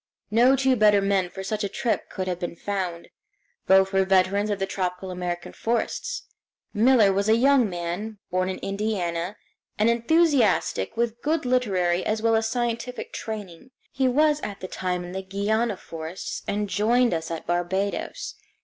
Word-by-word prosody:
No 245 +5 +5
two 265 -1 +3
better 210 -3 +5
men 195 -2 +1
for 190 +2 -7
such 210 +2 -2
a 200 - -1
trip 235 +3 -2
could 185 -1 -4
have 180 -1 -2
been 175 -1 -4
found. 180 -3 -4 0.6
Both 190 0 +5
were 195 0 +4
veterans 190 +2 +2
of 205 - 0
the 195 - -1
tropical 185 -1 -3
American 175 -1 -4
forests. - - -2 0.5
Miller 225 -2 +5
was 200 +2 0
a 220 - +6
young 255 -1 +4
man, 180 +5 -4
born 185 +1 +1
in 190 - -3
Indiana, 195 -3 -2 0.4
an 215 +2 +3
enthusiastic 235 - +2
with 235 0 -1
good 310 -1 0
literary 190 -9 +1
as 215 +1 0
well 225 0 +2
as 225 0 +1
scientific 240 +1 -3
training. 210 0 -7 0.2
He 265 -1 +1
was 300 +3 +3
at 200 -1 -5
the 185 - -6
time 180 -1 -3
in 175 - -8
the 190 +1 -4
Guiana 205 +3 -1
forests, 165 +1 -6
and 205 +1 -1
joined 230 +4 +2
us 165 -1 -3
at 165 -1 -5
Barbados. 175 +3 -2
205 Hz, 165 wpm, -25 LUFS, 185-235 Hz, 0.6 s, a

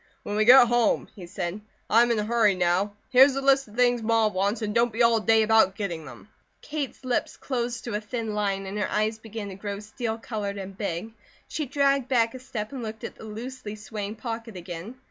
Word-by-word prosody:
"When 205 - -4
we 215 0 +3
get 250 +1 +9
home," 240 -1 +2
he 180 -4 -9
said. 175 +3 -4 0.3
"I 230 - +5
am 240 - +3
in 235 - +2
a 210 - 0
hurry 220 -3 +3
now. 180 +3 +1 0.2
Here's 265 +1 +7
a - - 0
list 275 -1 +3
of 210 - -15
things 245 -1 +3
Ma 225 -1 +3
wants, 200 +3 -1
and 210 -1 -2
don't 235 +1 +3
be 230 +2 +1
all 230 -1 +5
day 220 0 +4
about 220 -3 +4
getting 170 -6 -4
them." 130 +6 -12 0.3
Kate's 290 -4 -5
lips 250 -1 -1
closed 240 -2 -3
to 235 - -5
a 210 - -1
thin 225 0 -4
line 200 -2 -1
and 195 +2 -4
her 205 - -1
eyes 215 +1 0
began 220 -2 -7
to - - -7
grow 200 +1 -5
steel 220 +2 -4
coloured 210 -3 -4
and 195 0 -7
big. 200 +2 -4 0.3
She 305 -3 -3
dragged 275 -1 +2
back 230 -3 +2
a 255 - -7
step 220 -3 -5
and 270 -3 -6
looked 220 -1 -7
at - - -5
the - - -10
loosely 220 0 -7
swaying 210 0 -6
pocket 225 -2 -6
again. 175 +6 -7
220 Hz, 225 wpm, -26 LUFS, 205-240 Hz, 0.3 s, get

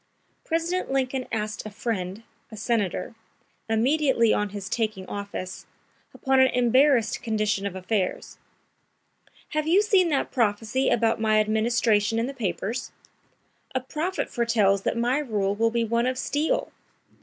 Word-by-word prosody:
President 335 0 -1
Lincoln 265 -1 -1
asked 215 -1 -3
a 215 - -6
friend, 205 -2 -4 0.3
a 220 - -9
senator, 215 -3 -1 0.6
immediately 240 0 +3
on 210 0 0
his 200 -1 -6
taking 215 -2 -2
office, 200 -2 -6 0.4
upon 265 0 +1
an 260 - +7
embarrassed 250 0 +3
condition 215 -3 0
of 195 - -6
affairs: 190 +1 -2 1.1
"Have 305 0 -1
you 375 +6 +5
seen 385 -4 +3
that 285 -3 0
prophecy 230 +1 +1
about 225 -1 +2
my 215 -1 +3
administration 220 0 +2
in 230 - +1
the 275 - -5
papers? 220 +1 -3 0.8
A - - +3
prophet 310 +9 -3
foretells 215 -5 +2
that 220 - -1
my 245 +4 +1
rule 210 -8 -1
will 225 +2 +2
be 235 0 0
one 235 +2 +1
of 255 0 -1
steel! 295 +4 -1
230 Hz, 140 wpm, -25 LUFS, 210-260 Hz, 1.1 s, an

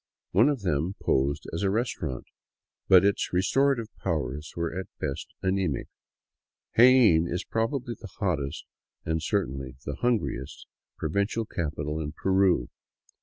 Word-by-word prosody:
One 110 +10 +5
of 140 -6 -1
them 85 +2 0
posed 70 +2 0
as 80 - -2
a 100 - +2
restaurant, 105 - -2 0.6
but 95 0 +7
its 100 - +1
restorative 115 +5 +1
powers 75 +4 -3
were 85 0 -1
at 95 0 -4
best 70 - -4
anemic. 95 -6 0 0.9
Jaen 115 -9 +6
is 90 - -2
probably 120 +2 -1
the 110 -2 -11
hottest, 75 - -2 0.4
and 80 0 0
certainly 65 -2 -2
the 70 - -4
hungriest, 120 -2 -1 0.3
provincial 100 +8 -1
capital 75 -3 -3
in 75 -1 -4
Peru. 95 -8 +2
95 Hz, 125 wpm, -27 LUFS, 75-110 Hz, 0.9 s, but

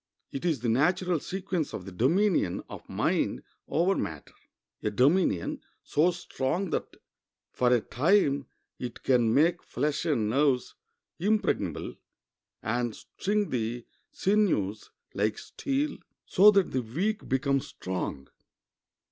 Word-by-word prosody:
It 135 - -5
is 155 -9 +1
the 120 - -1
natural 175 +8 +2
sequence 185 -2 -3
of 90 - -7
the 95 - -7
dominion 145 - +2
of - - -10
mind 65 - 0 0.2
over 175 +5 +2
matter—a 80 - -6
dominion 125 - +2 0.2
so 160 +4 +3
strong 175 0 -2
that - - -3 0.6
for 125 -1 +2
a 120 -2 +4
time 140 - +2 0.3
it 120 -1 -6
can 120 -4 +3
make 165 +7 +3
flesh 150 +5 -2
and 130 -10 +1
nerves 130 +2 +2 0.5
impregnable, 210 +4 0 0.7
and 120 0 -1
string 205 +1 -2
the 120 0 -2 0.3
sinews 180 - +1 0.2
like 105 +1 0
steel, 280 +1 -2 0.3
so 205 +3 +7
that 200 -3 +3
the 130 - 0
weak 185 - -2
become 135 +1 +2
strong. 90 - -5
140 Hz, 120 wpm, -28 LUFS, 120-180 Hz, 0.7 s, so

